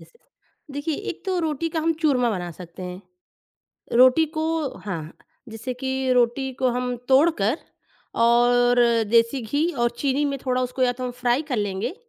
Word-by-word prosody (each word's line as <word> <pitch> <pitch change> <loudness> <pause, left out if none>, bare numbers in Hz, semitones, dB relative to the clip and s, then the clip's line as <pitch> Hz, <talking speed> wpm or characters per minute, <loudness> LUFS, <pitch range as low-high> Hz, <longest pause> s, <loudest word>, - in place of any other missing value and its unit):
Yes. - - -17 0.6
देखिए 285 +2 -3 0.2
एक - - -9
तो 370 -1 0
रोटी 320 0 -1
का 320 0 -2
हम 330 +1 +2
चूरमा 250 -6 +3
बना 175 -4 -3
सकते 175 +2 -11
हैं। 180 0 -7 1.0
रोटी 255 +6 +6
को 315 - 0 0.4
हाँ, 165 -4 -5 0.4
जैसे 225 +3 -6
कि 265 0 -1
रोटी 250 +2 +1
को 255 - +3
हम 250 0 -2
तोड़कर 270 -3 +3 0.6
और 245 +1 +4 0.3
देसी 235 +3 +3
घी 285 +9 0
और 240 -3 0
चीनी 280 +2 +1
में 280 -1 -1
थोड़ा 255 0 +1
उसको 250 +1 -2
या 245 -1 +3
तो 255 +1 -6
हम 250 - -2
फ्राइ 245 +3 0
कर 255 - 0
लेंगे, 205 - -2
250 Hz, 170 wpm, -23 LUFS, 235-280 Hz, 1.0 s, रोटी